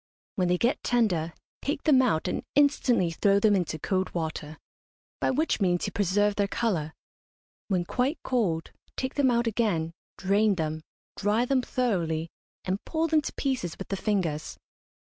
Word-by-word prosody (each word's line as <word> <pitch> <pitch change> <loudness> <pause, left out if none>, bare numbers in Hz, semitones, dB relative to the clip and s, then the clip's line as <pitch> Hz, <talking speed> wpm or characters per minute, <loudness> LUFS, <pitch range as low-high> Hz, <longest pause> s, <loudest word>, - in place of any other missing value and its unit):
When 185 -2 +1
they 180 0 +2
get 240 +8 +1
tender 185 -10 +1 0.3
take 290 +1 -2
them 275 -4 +5
out 200 -10 +1
and - - -2
instantly 265 - +3
throw 200 +4 +3
them 210 0 +4
into 175 -4 -1
cold 185 +4 -1
water, 155 -2 -4 0.6
by - - +1
which 295 -3 0
means 175 -2 +2
you - - -3
preserve 205 +1 +1
their 200 -1 +2
colour. 175 -9 -1 0.7
When 185 -4 0
quite 260 - 0
cold, 195 -11 0 0.3
take 260 0 -2
them 280 -3 +3
out 235 0 +2
again, 205 -8 0 0.2
drain 200 +2 +2
them, 155 -2 -2 0.3
dry 210 +4 +1
them 260 0 +2
thoroughly, 170 -11 -1 0.3
and 190 +2 -2
pull 325 0 -1
them 310 -1 +4
to - - -5
pieces 255 - -2
with 195 - -8
the 195 - -1
fingers. 185 -7 -1
200 Hz, 165 wpm, -27 LUFS, 175-245 Hz, 0.7 s, them